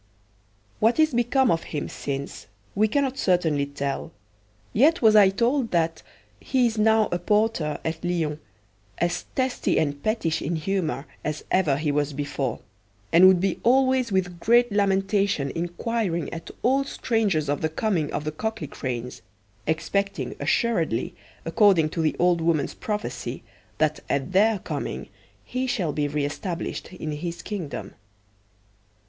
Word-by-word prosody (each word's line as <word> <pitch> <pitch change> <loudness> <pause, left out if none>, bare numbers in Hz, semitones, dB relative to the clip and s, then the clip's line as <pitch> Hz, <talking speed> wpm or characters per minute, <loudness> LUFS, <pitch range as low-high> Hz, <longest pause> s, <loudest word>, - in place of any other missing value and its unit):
What 225 +3 +3
is 310 -3 +4
become 240 +2 +3
of 165 - +1
him 150 - -4
since 140 0 -5 0.3
we 215 +2 +3
cannot 270 +3 0
certainly 160 -6 +2
tell, 140 -1 -4 0.6
yet 295 +6 +4
was 215 -1 +6
I 205 -2 +8
told 235 +5 +1
that 165 -1 0 0.4
he 255 -2 +1
is 230 -1 0
now 220 0 +4
a 175 - 0
porter 210 -5 +1
at 160 +1 -3
Lyons, 165 -4 -1 0.6
as 175 +1 -1
testy 260 -1 0
and 145 -2 0
pettish 170 -7 0
in 170 +4 -2
humour 160 -3 -2 0.2
as 150 0 -3
ever 160 -8 +3
he 150 0 0
was 145 0 0
before, 140 -3 -3 0.5
and 175 +3 +8
would 185 -1 +6
be 190 0 0
always 260 -1 +3
with 180 -2 -1
great 240 +4 +4
lamentation 195 -6 +1
inquiring 175 +1 -2
at 165 0 -7
all 270 +3 +3
strangers 220 - 0
of 145 0 -1
the 160 - +1
coming 165 -3 -1
of - - -2
the 155 - -2
Cocklicranes, 145 - -4 0.5
expecting 160 -3 -1
assuredly, 170 - 0 0.3
according 170 -3 +4
to 165 - -2
the 155 - +1
old 175 -1 +3
woman's 160 -3 +1
prophecy, 210 0 -4 0.3
that 155 -1 +1
at 140 +4 -1
their 210 +3 +4
coming - - -5 0.4
he 255 +1 -2
shall 185 - -1
be 145 0 0
re 145 0 -1
established 170 +5 -4
in 155 -4 -5
his 170 +3 -5
kingdom. 185 -9 -5
175 Hz, 145 wpm, -25 LUFS, 155-220 Hz, 0.6 s, I